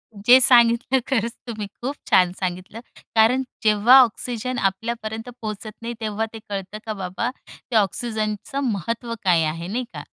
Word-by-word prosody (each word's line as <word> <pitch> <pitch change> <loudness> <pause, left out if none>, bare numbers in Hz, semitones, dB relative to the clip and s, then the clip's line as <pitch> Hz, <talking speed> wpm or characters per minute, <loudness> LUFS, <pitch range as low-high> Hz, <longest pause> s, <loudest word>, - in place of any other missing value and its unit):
जे 200 - -11
जे 255 +2 +9
सांगितलं 240 +1 +5
खरंच 235 -4 0 0.2
तुम्ही 215 -3 -5
खूप 270 +4 -3
छान 180 -1 +5
सांगितलं. 185 +3 -4 0.4
कारण 230 +4 +4 0.2
जेव्हा 215 +4 +6
ऑक्सिजन 245 +1 -2
आपल्यापर्यंत 220 +3 -3
पोहचत 215 0 -5
नाही. 235 +1 -4
तेव्हा 215 0 -2
ते 225 - -7
कळतं 200 0 -5
का 220 - -3
बाबा 190 +4 -3 0.2
ते 240 - -9
ऑक्सिजनच 215 +2 -1
महत्व 230 +1 -2
काय 175 -4 +3
आहे 165 +2 -3
नाही 235 +7 -2
का? - - -7
220 Hz, 155 wpm, -22 LUFS, 200-235 Hz, 0.4 s, जे